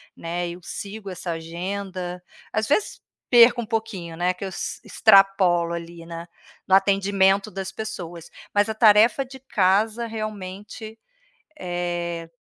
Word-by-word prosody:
né, 175 Hz, +1 st, -3 dB
eu 175 Hz, +1 st, -8 dB
sigo 200 Hz, +3 st, -7 dB
essa 180 Hz, -1 st, -5 dB
agenda. 180 Hz, +2 st, -5 dB, 0.3 s
Às 220 Hz, 0 st, -1 dB
vezes, 350 Hz, +8 st, 0 dB, 0.3 s
perco 240 Hz, 0 st, +7 dB
um -, -, -7 dB
pouquinho, 215 Hz, -7 st, -4 dB
né, 175 Hz, +2 st, +1 dB
que 180 Hz, +1 st, -8 dB
eu -, -, -4 dB
ex 185 Hz, -, -5 dB
extrapolo 195 Hz, -5 st, +4 dB
ali 170 Hz, 0 st, -7 dB
na 170 Hz, 0 st, -8 dB, 0.4 s
no 190 Hz, -, +5 dB
atendimento 195 Hz, +1 st, +3 dB
das 190 Hz, -1 st, -5 dB
pessoas. 175 Hz, -6 st, -7 dB, 0.2 s
Mas 205 Hz, +1 st, +3 dB
a 220 Hz, -, -2 dB
tarefa 220 Hz, +4 st, +5 dB
de 265 Hz, +1 st, -12 dB
casa, 220 Hz, -1 st, +1 dB
realmente, 215 Hz, 0 st, -7 dB, 0.6 s
eh, 175 Hz, -1 st, -3 dB
195 Hz, 135 wpm, -24 LUFS, 175-215 Hz, 0.6 s, perco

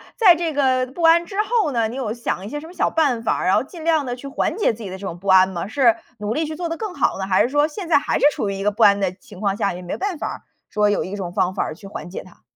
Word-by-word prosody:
在 385 Hz, -7 st, +6 dB
这 330 Hz, -2 st, -2 dB
个 260 Hz, -2 st, +2 dB
不 330 Hz, +6 st, -7 dB
安 335 Hz, +1 st, +5 dB
之 390 Hz, -, -10 dB
后 430 Hz, -8 st, +1 dB
呢， 230 Hz, -2 st, +1 dB
你 235 Hz, -, -7 dB
有 230 Hz, -5 st, -2 dB
想 230 Hz, -5 st, -3 dB
一 210 Hz, -, -6 dB
些 295 Hz, -, -4 dB
什 320 Hz, -, -10 dB
么 345 Hz, -, -12 dB
小 -, -, +1 dB
办 280 Hz, -8 st, +1 dB
法 -, -, +1 dB
儿， -, -, -2 dB
然 185 Hz, -, +4 dB
后 -, -, +2 dB
尽 320 Hz, +4 st, -11 dB
量 320 Hz, -3 st, +2 dB
地 245 Hz, -1 st, -3 dB
去 265 Hz, +3 st, -9 dB
缓 -, -, -1 dB
解 420 Hz, -, +2 dB
自 225 Hz, +1 st, -10 dB
己 200 Hz, -, -6 dB
的 190 Hz, -, -6 dB
这 200 Hz, -, -8 dB
种 175 Hz, -2 st, -6 dB
不 200 Hz, -, -11 dB
安 190 Hz, 0 st, +6 dB
吗？ 175 Hz, 0 st, -4 dB
是 240 Hz, 0 st, +3 dB, 0.2 s
努 210 Hz, +1 st, -2 dB
力 315 Hz, +4 st, -1 dB
去 310 Hz, +1 st, -5 dB
做 345 Hz, +1 st, -3 dB
得 330 Hz, -, -3 dB
更 430 Hz, -5 st, -5 dB
好 -, -, 0 dB
呢， 190 Hz, -, -2 dB
还 185 Hz, -1 st, +4 dB
是 245 Hz, -, -1 dB
说 290 Hz, +2 st, +2 dB
现 335 Hz, +3 st, -7 dB
在 330 Hz, -, +6 dB
还 285 Hz, -, 0 dB
是 -, -, +3 dB
处 200 Hz, -, -2 dB
于 -, -, -2 dB
一 195 Hz, -, -4 dB
个 210 Hz, -, +2 dB
不 225 Hz, +3 st, +1 dB
安 200 Hz, 0 st, +6 dB
的 190 Hz, -2 st, +1 dB
情 185 Hz, +1 st, -15 dB
况 200 Hz, -2 st, +1 dB
下， 200 Hz, -4 st, 0 dB
也 180 Hz, -, -8 dB
没 175 Hz, -, -5 dB
办 385 Hz, -3 st, -2 dB
法 -, -, -3 dB
儿 -, -, -6 dB, 0.3 s
说 210 Hz, -1 st, +2 dB
有 205 Hz, -, +1 dB
一 190 Hz, +3 st, -5 dB
种 180 Hz, -3 st, -5 dB
方 190 Hz, -2 st, +1 dB
法 -, -, -1 dB
儿 155 Hz, -, -5 dB
去 195 Hz, +4 st, -12 dB
缓 185 Hz, -, -8 dB
解 190 Hz, -, -7 dB
它。 185 Hz, -, -19 dB
235 Hz, 370 characters per minute, -21 LUFS, 195-315 Hz, 0.3 s, 在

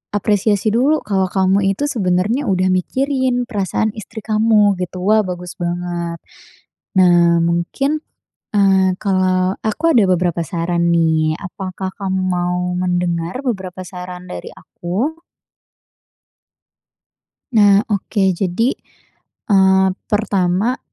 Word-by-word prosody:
apresiasi 205 Hz, +1 st, +1 dB
dulu, 270 Hz, +7 st, +2 dB
kalau 190 Hz, -2 st, 0 dB
kamu 190 Hz, +1 st, +2 dB, 0.2 s
itu 285 Hz, -, -4 dB
sebenarnya 210 Hz, +5 st, 0 dB
udah 185 Hz, -1 st, +1 dB
mikirin 260 Hz, +6 st, 0 dB
perasaan 215 Hz, -1 st, -1 dB
istri 220 Hz, 0 st, -9 dB
kamu 215 Hz, -3 st, +3 dB
gitu, 180 Hz, 0 st, -5 dB
wah 215 Hz, +3 st, +4 dB
bagus 180 Hz, -1 st, -6 dB
banget. 175 Hz, -1 st, -3 dB, 0.8 s
Nah, 175 Hz, -2 st, +4 dB
mungkin, 170 Hz, -, 0 dB, 0.5 s
eee, 190 Hz, -2 st, +3 dB
kalau 185 Hz, -1 st, +1 dB
aku 220 Hz, +9 st, -2 dB
ada 220 Hz, -, +6 dB
beberapa 175 Hz, -2 st, 0 dB
saran 170 Hz, +2 st, 0 dB
nih, 160 Hz, -2 st, +2 dB
apakah 190 Hz, -1 st, -5 dB
kamu 190 Hz, -2 st, -2 dB
mau 180 Hz, -1 st, -1 dB, 0.2 s
mendengar 175 Hz, +3 st, -1 dB
beberapa 190 Hz, -8 st, -4 dB
saran 180 Hz, 0 st, -9 dB
dari 90 Hz, -, -7 dB
aku? 230 Hz, -, -4 dB, 2.3 s
Nah 205 Hz, -2 st, +5 dB
oke, 200 Hz, 0 st, 0 dB
jadi, 195 Hz, +8 st, 0 dB, 0.8 s
eee, 190 Hz, -1 st, +4 dB, 0.2 s
pertama 205 Hz, +2 st, 0 dB
190 Hz, 105 wpm, -18 LUFS, 180-215 Hz, 2.3 s, ada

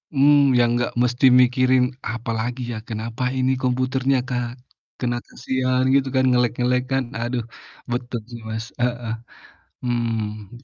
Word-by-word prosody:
Mmm, 140 Hz, -1 st, +5 dB
yang 120 Hz, -1 st, +4 dB
nggak 120 Hz, -, -1 dB
mesti 125 Hz, +2 st, +2 dB, 0.2 s
mikirin, 130 Hz, 0 st, +3 dB, 0.3 s
"Apalagi 115 Hz, +2 st, -3 dB
ya? -, -, -4 dB
Kenapa 115 Hz, +3 st, -4 dB
ini 130 Hz, 0 st, +2 dB
komputernya, 130 Hz, +1 st, +1 dB
Kak?" 125 Hz, -1 st, -1 dB, 0.5 s
Karena 120 Hz, -1 st, -1 dB
kasian 130 Hz, -1 st, -1 dB
gitu 135 Hz, -1 st, +3 dB
kan, 130 Hz, -, +4 dB
nge-lag-nge-lag 125 Hz, 0 st, +2 dB
kan. 135 Hz, 0 st, +2 dB, 0.2 s
Aduh 120 Hz, 0 st, -1 dB, 0.5 s
betul 120 Hz, 0 st, -2 dB
sih 120 Hz, -, -7 dB
Mas, 110 Hz, 0 st, -3 dB, 0.2 s
heeh. 120 Hz, -2 st, -1 dB, 0.7 s
Hmm. 115 Hz, -2 st, -3 dB
125 Hz, 130 wpm, -22 LUFS, 120-130 Hz, 0.7 s, Mmm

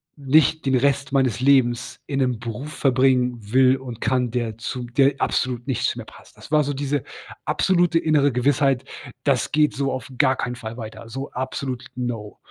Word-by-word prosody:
nicht 150 Hz, +2 st, +2 dB
den 135 Hz, -, +3 dB
Rest 140 Hz, +2 st, +1 dB
meines 130 Hz, -5 st, +1 dB
Lebens 120 Hz, -3 st, +2 dB
in 140 Hz, -1 st, -2 dB
'nem 125 Hz, -4 st, 0 dB
Beruf 120 Hz, +6 st, -6 dB
verbringen 130 Hz, -2 st, +2 dB
will 130 Hz, +1 st, +5 dB
und 125 Hz, -4 st, -9 dB
kann, 125 Hz, -1 st, +1 dB
der 115 Hz, -2 st, -3 dB
zu 125 Hz, +1 st, -4 dB
der 135 Hz, +3 st, +2 dB
absolut 125 Hz, -2 st, -1 dB
nicht 130 Hz, -3 st, -1 dB
zu -, -, 0 dB
mir -, -, -7 dB
passt. -, -, -17 dB
Das -, -, -13 dB
war 155 Hz, -1 st, +4 dB
so 145 Hz, +1 st, -2 dB
diese 140 Hz, 0 st, -1 dB, 0.4 s
absolute 175 Hz, -2 st, +2 dB
innere 150 Hz, -3 st, +3 dB
Gewissheit: 135 Hz, +1 st, +1 dB, 0.4 s
„Das 135 Hz, -5 st, +1 dB
geht 150 Hz, 0 st, +2 dB
so 135 Hz, 0 st, -1 dB
auf 130 Hz, -1 st, -5 dB
gar 135 Hz, -3 st, +4 dB
keinen 125 Hz, -1 st, -3 dB
Fall 115 Hz, -1 st, -7 dB
weiter.“ 115 Hz, 0 st, -8 dB
So 135 Hz, +4 st, -6 dB
absolut: 130 Hz, 0 st, -4 dB
„No!“ 120 Hz, -4 st, -4 dB
130 Hz, 180 wpm, -23 LUFS, 120-140 Hz, 0.4 s, will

